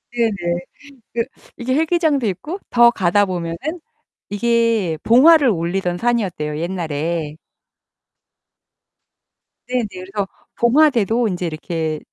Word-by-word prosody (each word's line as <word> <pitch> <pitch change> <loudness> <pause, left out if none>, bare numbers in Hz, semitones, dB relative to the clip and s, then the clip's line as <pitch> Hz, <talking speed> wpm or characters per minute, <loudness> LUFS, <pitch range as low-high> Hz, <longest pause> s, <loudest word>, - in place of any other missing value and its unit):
네네. 195 -7 0 0.5
그 230 0 0 0.3
이게 255 +2 -1
헬기장도 315 -4 +1
있고 210 - -4
더 240 0 +6
가다 205 -1 +2
보면은 170 -3 -4 0.7
이게 225 -6 +1
봉화를 275 +4 +6
올리던 175 -1 -1
산이었대요, 185 -11 -1
옛날에. 165 -2 -3 2.3
네네. 250 -3 -1 0.3
그래서 200 -2 -1 0.3
봉화대도 235 -3 +3
인제 180 -3 -3
이렇게 160 -1 -3
205 Hz, 235 characters per minute, -19 LUFS, 170-240 Hz, 2.3 s, 더